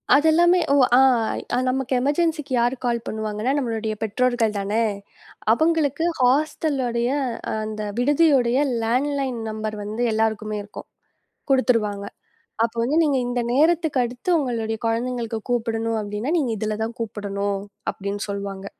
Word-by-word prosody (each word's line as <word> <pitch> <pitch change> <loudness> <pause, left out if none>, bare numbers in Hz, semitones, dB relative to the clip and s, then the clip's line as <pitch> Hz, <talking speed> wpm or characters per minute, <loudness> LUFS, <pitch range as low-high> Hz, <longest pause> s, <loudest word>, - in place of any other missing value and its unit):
அதெல்லாமே 335 +4 +5
ஓ - - +5 0.2
ஆஹ் 250 -1 +2
நமக்கு 265 0 -1
எமர்ஜென்ஸிக்கு 300 0 0
யாரு 245 +2 +1
கால் 235 -1 +1
பண்ணுவாங்கன்னா 220 +2 -2
நம்மளுடைய 225 -5 -2
பெற்றோர்கள் 225 0 +1
தானே, 205 +3 0 0.7
அவங்களுக்கு 315 +2 +1 0.2
ஹாஸ்டளுடைய 255 -3 +1 0.5
அந்த 215 0 -5 0.2
விடுதியோட 285 -1 +4 0.4
லாண்ட்லைன் 260 +1 0
நம்பர் 215 0 -4
வந்து 215 +3 -4
எல்லாருக்குமே 215 -1 -1
இருக்கும். 205 - -10 0.6
குடுத்துருவாங்க. 225 -6 +2 0.6
அப்ப 230 - 0
வந்து 275 +7 +1
நீங்க 290 -4 +2
இந்த 245 0 -1
நேரத்துக்கு 315 0 +3
அடுத்து 245 +7 -5
உங்களுடைய 225 -5 -2
குழந்தைகளுக்குக் 230 -1 -2
கூப்பிடணும் 225 -1 0
அப்டின்னா 210 +6 -3
நீங்க 265 -7 0
இதுல 215 +1 -2
தான் 230 +1 -4
கூப்பிடணும் 200 -2 -3 0.3
அப்டின்னு 200 +1 -4
சொல்லுவாங்க. 200 -1 -5
235 Hz, 120 wpm, -23 LUFS, 215-270 Hz, 0.7 s, அதெல்லாமே